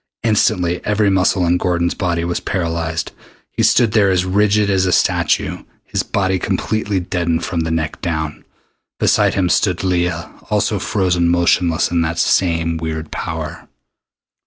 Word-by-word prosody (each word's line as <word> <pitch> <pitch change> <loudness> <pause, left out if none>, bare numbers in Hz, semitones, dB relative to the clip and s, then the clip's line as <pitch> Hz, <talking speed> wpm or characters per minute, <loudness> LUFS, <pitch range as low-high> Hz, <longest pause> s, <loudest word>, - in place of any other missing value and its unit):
Instantly 90 -6 +1
every 105 -1 +1
muscle 95 -1 +2
in 85 +1 +2
Gordon's 85 -1 0
body 85 -3 -1
was 85 0 -2
paralyzed. 80 -2 -2 0.4
He - - -2
stood 115 -3 +4
there 105 -3 +3
as 90 -1 +1
rigid 105 +2 +2
as 95 -1 +1
a - - +1
statue, - - +1 0.2
his - - -2
body 95 -2 -1
completely 105 +1 -1
deadened 85 -2 -1
from 85 - -3
the 80 0 -1
neck 80 -1 -2
down. 80 -3 -3 0.6
Beside - - +2
him 95 -2 +1
stood 90 0 +1
Leah, 90 -2 -1 0.2
also - - 0
frozen 90 -4 +1
motionless 85 -1 +2
in 85 -1 +1
that 85 +1 -2
same 85 -2 +1
weird 80 -1 -5
power. - - -5
90 Hz, 150 wpm, -18 LUFS, 85-95 Hz, 0.6 s, stood